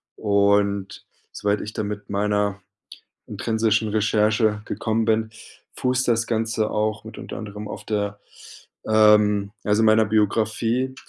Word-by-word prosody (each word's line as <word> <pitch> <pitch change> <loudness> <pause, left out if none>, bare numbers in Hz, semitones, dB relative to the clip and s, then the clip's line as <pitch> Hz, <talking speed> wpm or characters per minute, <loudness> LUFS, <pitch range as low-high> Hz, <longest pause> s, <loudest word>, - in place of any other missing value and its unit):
Und 100 -1 +1 0.3
soweit 105 0 -1
ich 105 - -7
dann 105 - -3
mit 105 0 -7
meiner 105 0 0 0.7
intrinsischen 110 +1 0
Recherche 105 0 +1
gekommen 110 +1 -1
bin, 110 0 +1 0.4
fußt 125 0 0
das 115 -1 +2
Ganze 110 -1 -1
auch 105 0 -1
mit 110 0 -10
unter - - -7
anderem 105 -1 -7
auf - - -8
der, 105 -1 -3 0.7
ähm, 105 -2 +4
also, 105 +1 +2
meiner 110 0 +5
Biografie 110 +4 0
105 Hz, 125 wpm, -23 LUFS, 105-110 Hz, 0.7 s, meiner